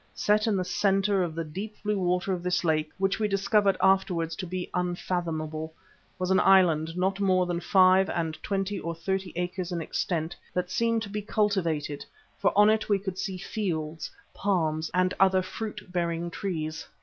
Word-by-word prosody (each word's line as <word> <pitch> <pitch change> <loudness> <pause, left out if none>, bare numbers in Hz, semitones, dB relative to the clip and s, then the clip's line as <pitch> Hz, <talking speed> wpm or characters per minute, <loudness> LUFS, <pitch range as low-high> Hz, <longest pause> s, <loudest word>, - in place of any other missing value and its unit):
Set 210 +1 +2
in 215 - +2
the 185 -1 0
centre 195 +1 +2
of 170 -3 -2
the 165 - -2
deep 195 +8 -6
blue 210 -1 0
water 180 +1 0
of 180 - -3
this 180 +1 0
lake, 155 -2 +1
which 195 +2 0
we 215 - +2
discovered 200 0 +2
afterwards 180 -4 +2
to 185 - -5
be 180 +1 -4
unfathomable, 165 -3 -2 0.5
was 185 0 -1
an 190 - +5
island 170 -4 +4
not 190 +2 0
more 185 -2 +3
than 175 -1 -2
five 185 +1 +5
and 165 -2 -1
twenty 195 0 -2
or 170 -1 -4
thirty 190 +2 -2
acres 180 +1 -3
in 175 - -2
extent, 165 0 -2 0.2
that 180 0 -1
seemed 230 -1 +1
to 200 - -7
be 210 +1 -3
cultivated, 185 -9 -1 0.4
for - - +3
on 210 0 +7
it 220 0 +2
we 205 - +4
could 190 -1 -5
see 190 -2 -3
fields, 165 -6 -3 0.2
palms 160 -5 0
and 185 0 +2
other 190 -1 +4
fruit 210 0 -7
bearing 170 -1 -1
trees. 160 -5 -4
185 Hz, 180 wpm, -27 LUFS, 170-195 Hz, 0.5 s, on